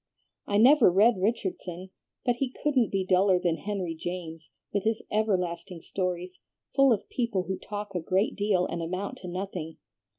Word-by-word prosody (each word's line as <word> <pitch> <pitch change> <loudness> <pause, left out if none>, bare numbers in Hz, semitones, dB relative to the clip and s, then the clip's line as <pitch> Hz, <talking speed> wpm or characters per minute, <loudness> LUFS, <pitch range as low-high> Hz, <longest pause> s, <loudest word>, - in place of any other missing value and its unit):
"I 205 - +1
never 255 +2 +7
read 205 +2 +4
Richardson, 185 -3 -2 0.3
but 245 -1 +2
he 270 0 0
couldn't 265 -7 +3
be 195 -1 0
duller 185 0 +4
than 175 -2 0
Henry 195 -5 -3
James, 165 -1 -6 0.2
with 200 -2 0
his 220 0 0
everlasting 180 -5 -1
stories, 180 -1 -3 0.3
full 275 -1 +5
of 210 -4 0
people 230 -7 -1
who 190 0 -4
talk 205 -1 -6
a 180 - -1
great 185 +5 0
deal 200 -3 +2
and 170 - -4
amount 185 +4 -4
to 180 - -8
nothing. 180 -3 -5
190 Hz, 165 wpm, -28 LUFS, 180-210 Hz, 0.3 s, never